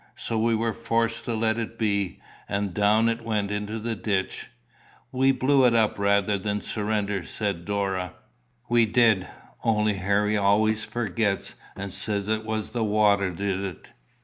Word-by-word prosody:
So 115 - -2
we 115 +1 +2
were 115 0 0
forced 115 0 -1
to 120 - -1
let 110 +1 +1
it 115 0 -5
be, 100 -4 -1 0.3
and 100 -2 -1
down 105 +4 +3
it 115 0 0
went 105 -3 -1
into 105 +1 -3
the 115 +1 -3
ditch." 100 -2 -2 0.6
"We 135 +1 +3
blew 135 +1 +3
it 120 -2 +5
up 110 -2 +2
rather 100 0 +2
than 105 +1 -2
surrender," 105 -3 -2
said 100 -5 -3
Dora. 95 -3 -2 0.5
"We 120 -1 +4
did; 110 -5 +3 0.4
only 105 -2 +2
Harry 100 +3 +1
always 105 +2 +2
forgets, 105 -2 -1 0.2
and 100 0 -5
says 100 +1 0
it 110 0 -1
was 110 -1 -3
the 120 -2 -1
water 105 -2 +3
did 95 +2 -2
it." 95 -4 -7
105 Hz, 160 wpm, -25 LUFS, 100-115 Hz, 0.6 s, it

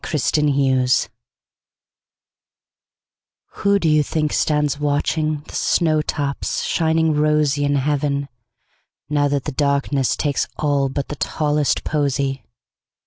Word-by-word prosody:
Everlasting 150 0 +1
Flowers 130 -2 +2 2.4
WHO 200 0 +1
do 175 - 0
you 155 -1 +4
think 150 +1 -1
stands 150 -2 +1
watchingThe 150 +1 -1
snow 155 -3 +1
tops 145 -2 -3
shining 160 -1 +1
rosyIn 150 -1 +1
heaven, 140 0 -1 0.8
now 145 -1 +2
that 140 -1 -1
the 150 - -4
darknessTakes 140 0 0
all 145 -2 +1
but 140 +1 -4
the 150 - -4
tallest 150 -1 0
posy? 140 -3 -1
145 Hz, 100 wpm, -20 LUFS, 140-150 Hz, 2.4 s, you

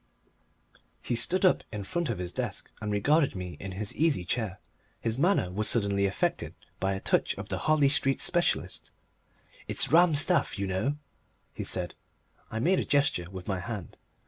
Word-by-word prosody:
He - - -2
stood 180 +11 +2
up 185 - +4
in 105 -2 -5
front 170 - -2
of 115 - -1
his 90 -1 -4
desk - - -4
and 105 -1 -3
regarded 145 +8 +2
me 90 -2 -6
in 100 -1 -6
his 100 +2 -3
easy 150 - +1
chair; 105 -1 -2 0.4
his 115 +2 -2
manner 170 - +2
was 105 +3 -1
suddenly 100 -3 +1
affected 95 - -2 0.2
by 95 0 0
a - - -4
touch - - +1
of - - -8
the - - -2
Harley 155 -2 +5
Street 135 -1 +2
specialist. 175 -1 0 0.8
"It's - - +3
rum 170 0 +6
stuff, 160 -1 +3
you 100 - -1
know," 95 +10 -1 0.6
he - - -5
said. - - -1 0.6
I 110 - -5
made 175 +12 +2
a - - 0
gesture 140 -12 +1
with 95 -1 -9
my 95 -2 -1
hand. 100 -3 -6
110 Hz, 175 wpm, -28 LUFS, 95-150 Hz, 0.8 s, rum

